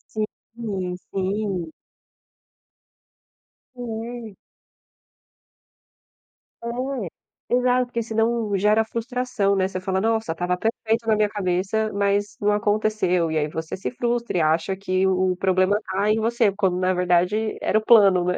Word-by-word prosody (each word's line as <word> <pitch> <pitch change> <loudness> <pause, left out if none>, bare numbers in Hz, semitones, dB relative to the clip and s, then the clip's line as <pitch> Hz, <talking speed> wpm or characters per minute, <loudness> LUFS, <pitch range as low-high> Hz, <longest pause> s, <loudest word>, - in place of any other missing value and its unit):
Sim, 215 -3 -4
sim. 190 -3 -2 2.0
É. 230 -2 -6 2.3
É, 240 -2 -4
exato, 250 0 +2
porque 235 -1 -3
senão 225 -1 0
gera 210 +3 +3
frustração, 235 -2 -1
né? 190 -1 +2
Você 190 -1 -5
fala: 190 0 -1
"Nossa, 225 -4 0
estava 175 +2 -1
perfeito 225 +2 -1
na 220 - +4
minha 210 -1 +2
cabeça, 200 +2 -1
mas 200 0 0
não 205 0 +3
aconteceu." 205 -5 +1
E 160 - 0
aí 150 - +1
você 160 +2 -5
se 190 - -4
frustra, 240 -4 -1
e - - +3
acha 165 +4 +1
que 190 -1 0
o 185 -1 +1
problema 185 +2 +2
tá 200 +2 0
em 215 +1 +3
você, 230 -1 +2
quando 190 -2 0
na 185 0 +2
verdade 180 +4 +1
era - - +2
o 215 - -1
plano, 195 -6 +6
né? 180 0 0
205 Hz, 135 wpm, -23 LUFS, 185-225 Hz, 2.3 s, plano